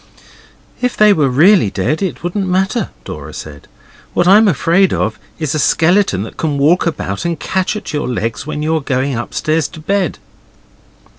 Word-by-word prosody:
'If 250 -1 -1
they 210 -1 +6
were 150 -7 +2
really 165 - +4
dead 100 - -1
it 190 -4 -3
wouldn't 190 +3 -2
matter,' 190 +4 0 0.2
Dora 75 +1 -8
said. 70 -2 -9 0.5
'What 175 - +2
I'm 210 +4 +6
afraid 185 +2 +2
of 110 0 -1 0.2
is 155 -2 -2
a 155 - -1
skeleton 165 - +2
that 110 - -10
can 150 -3 -1
walk 160 +6 +3
about 100 -12 -3
and 170 -3 -2
catch 190 +2 -1
at 210 - -6
your 150 -2 -2
legs 115 +1 -3
when 150 -1 -4
you're 160 0 0
going 135 -1 -1
upstairs 155 +6 -1
to 160 - -12
bed. 195 +3 -1
160 Hz, 170 wpm, -16 LUFS, 135-190 Hz, 0.5 s, they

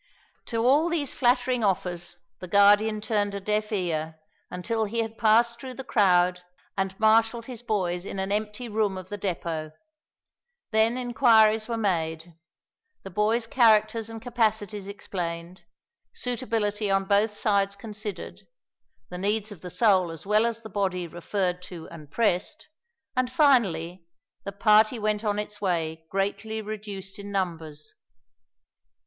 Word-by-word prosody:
To 230 0 -1
all 295 +7 +4
these 310 -5 0
flattering 250 -1 +2
offers 180 -3 -1 0.2
the 185 - -7
Guardian 205 +3 +4
turned 205 -2 -1
a - - -3
deaf 210 +2 -1
ear, 160 -5 -2 0.3
until 220 +5 -2
he 230 +3 -1
had 225 0 -5
passed 235 +2 +3
through 260 -1 -7
the 265 - -6
crowd 180 -5 +3 0.3
and 195 -1 -2
marshalled 225 +1 +3
his 245 -2 -7
boys 185 -6 -1
in 195 - -6
an 190 +1 -2
empty 210 +3 -2
room 210 -3 0
of 185 0 -9
the 205 - -4
depot. 165 -5 -3 1.0
Then 220 +2 +3
inquiries 225 -3 +4
were 230 -1 -2
made; 165 -5 -2 0.7
the 195 - -8
boys' 215 +5 +1
characters 225 -2 +3
and 225 0 -7
capacities 220 -4 -1
explained; 175 -3 -6 0.5
suitability 225 - -1
on 195 0 +2
both 205 +2 +2
sides 200 -2 +1
considered; 210 0 -7 0.6
the 180 - -6
needs 210 +2 0
of 200 - -11
the 180 - -7
soul 190 -3 +3
as 165 +1 -8
well 215 +3 +3
as 230 0 -4
the 220 - -8
body 185 -3 -1
referred 180 +2 -2
to 170 -3 -9
and 155 -3 -11
pressed; 215 - -1 0.5
and, 255 -1 0
finally, 185 - +2 0.4
the 200 - -3
party 215 +3 +4
went 215 0 -1
on 205 -1 0
its 210 0 -5
way 160 -4 -2
greatly 200 +3 -2
reduced 205 -2 -7
in 200 0 -8
numbers. 165 -6 -4
205 Hz, 145 wpm, -26 LUFS, 185-225 Hz, 1.0 s, all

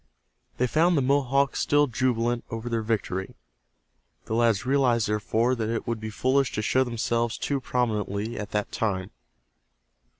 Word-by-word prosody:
They 125 - +2
found 165 +6 +3
the 140 - +2
Mohawks 135 0 +2
still 145 0 +3
jubilant 120 -2 0
over 115 +1 -5
their 115 -1 0
victory. 105 -4 -2 0.9
The - - -4
lads 115 -2 +2
realized, 125 -4 +2
therefore, 110 +3 +1
that 110 -3 -2
it 115 0 -2
would 115 -1 -2
be 110 0 -5
foolish 130 +4 +1
to 110 - -2
show 130 +4 +3
themselves 115 -1 -1
too 140 -2 -2
prominently 110 -3 -1
at 105 - -5
that 105 0 -2
time. 95 -4 -2
115 Hz, 155 wpm, -26 LUFS, 110-130 Hz, 0.9 s, found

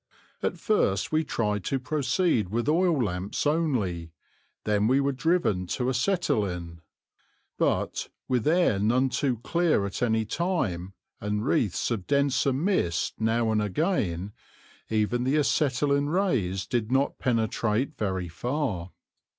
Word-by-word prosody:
At - - -1
first 100 - +1
we 155 +1 +2
tried 105 -8 -1
to 135 - 0
proceed 130 - 0
with 115 +5 -1
oil 165 -3 +3
lamps 95 +3 -3
only; 125 - 0 0.5
then 105 0 +2
we 130 +3 +4
were 140 0 +1
driven 135 - +1
to 125 -1 0
acetylene; 100 - -1 0.8
but, - - 0 0.2
with 125 0 0
air 165 - +3
none 125 +6 +2
too 130 -2 0
clear 170 - +2
at 100 - -5
any 110 -2 +1
time 105 - -2 0.3
and 105 +1 -2
wreaths 120 - +1
of 105 -6 -3
denser 140 -1 +2
mist 135 - 0
now 110 0 +1
and 110 -1 +2
again, 105 - -1 0.6
even 110 +3 +1
the 130 +3 +1
acetylene 140 -1 +2
rays 120 - 0
did 120 -2 -2
not 135 +2 +1
penetrate 115 +2 0
very 95 -4 -2
far. 105 - -3
120 Hz, 130 wpm, -27 LUFS, 105-145 Hz, 0.8 s, we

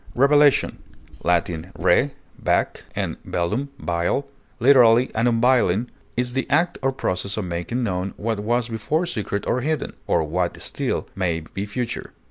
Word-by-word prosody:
Revelation 145 +2 +4 0.4
(L. 85 -1 +3 0.3
re, 140 - +3 0.3
back, - - 0
and - - -3
velum, 105 +11 -1
veil), 85 +7 -1 0.3
literally 125 -1 +6
an 115 +2 +2
unveiling, 120 -2 +3 0.3
is 125 0 -1
the 135 0 -2
act 160 +5 +2
or 135 0 +2
process 100 -6 -2
of 105 - -2
making 90 +8 -2
known 95 -2 -2
what 110 -1 -2
was 120 +3 0
before 125 +9 -1
secret 105 - -3
or 125 - 0
hidden, 155 +1 -1
or - - +2
what 85 +3 -1
may - - -13
still - - -2 0.5
be 95 +1 -3
future. 120 +3 -4
115 Hz, 145 wpm, -23 LUFS, 95-130 Hz, 0.5 s, literally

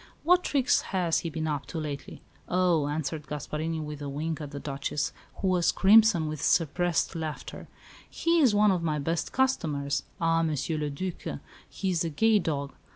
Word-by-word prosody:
"What 360 +3 +4
tricks 275 -2 +2 0.2
has 170 -3 +2
he 165 - -4
been 160 0 -3
up 145 -2 -3
to 170 - -6
lately?" 150 -3 -6 0.3
"Oh," 175 -5 +2
answered 150 0 -3
Gasparini, 155 +3 -3
with 150 -1 -6
a 145 - -4
wink 155 +3 -3
at 145 - -5
the 140 0 -7
Duchess, 140 +1 -3 0.2
who 195 - -2
was 180 -2 +3
crimson 205 -5 +5
with 155 -2 -5
suppressed 170 0 +1
laughter, 160 -2 -6 0.4
"he 335 0 +1
is 255 -9 +4
one 210 0 +5
of 180 -2 0
my 155 -2 0
best 160 +3 -2
customers. 145 - 0 0.2
Ah, 165 0 +2
Monsieur 155 0 -1
le 150 -1 -1
Duc, 180 +5 -5 0.3
he 190 -1 -2
is 170 -2 0
a 165 - -1
gay 220 +7 +3
dog. 140 -6 -3
160 Hz, 180 wpm, -28 LUFS, 150-185 Hz, 0.4 s, crimson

